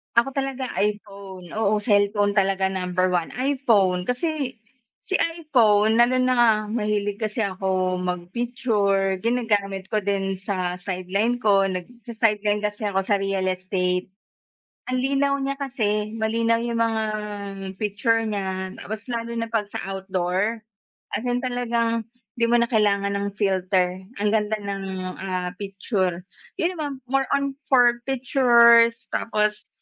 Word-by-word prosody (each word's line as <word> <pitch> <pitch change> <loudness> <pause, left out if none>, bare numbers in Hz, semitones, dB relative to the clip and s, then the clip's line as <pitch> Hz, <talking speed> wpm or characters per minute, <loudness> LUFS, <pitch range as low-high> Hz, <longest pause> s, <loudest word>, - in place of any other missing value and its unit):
Ako 235 +3 +4
talaga 270 -1 -3
iPhone, 200 -3 -3
oo, 215 -1 +2
cellphone 205 -1 +2
talaga 195 -1 +2
number 185 -1 0
1 175 -2 -1
iPhone 230 -9 +2
kasi, 275 - -2 0.5
si 380 - -1
iPhone 235 -10 +3
lalo 240 +2 +4
na 255 0 +3
nga 240 -1 +6 0.2
mahilig 210 -2 -1
kasi 215 +1 -2
ako 185 -2 0
magpicture, 195 +1 0
ginagamit 205 -5 0
ko 215 - 0
din 195 -1 -1
sa 185 -2 -3
sideline 195 +6 -1
ko 200 -3 +4
nagsa-sideline 210 +1 -1
kasi 210 0 -3
ako 195 -2 +1
sa 200 +1 +1
real 195 -1 -1
estate. 185 0 -1 0.9
Ang 255 - +1
linaw 275 +1 +1
niya 275 0 -2
kasi 215 -6 -1
malinaw 230 +1 +1
yung 235 0 -2
mga 225 -1 0 0.8
picture 225 +2 +1
niya 190 -2 -3
tapos 220 +4 -7
lalo 235 -1 -3
na 230 0 -3
pag 215 -3 -2
sa - - -3
outdoor, 190 +3 -1 0.6
as 215 - -5
in 245 0 0
talagang 235 -2 -1 0.3
di 235 - +2
mo 240 0 +4
na 235 - +2
kailangan 200 -3 +2
ng 200 0 -1
filter 185 -1 +1 0.2
ang 210 - +2
ganda 215 0 +1
ng, 200 -1 -4 0.4
ah, 185 -1 -2
picture, 190 -3 -2 0.4
yun 355 +2 0
naman 290 -4 -4
more 270 +1 +1
on 280 0 +1 0.2
for 240 -2 +5
pictures 235 -3 +5
tapos, 210 -1 -1
210 Hz, 135 wpm, -24 LUFS, 195-240 Hz, 0.9 s, nga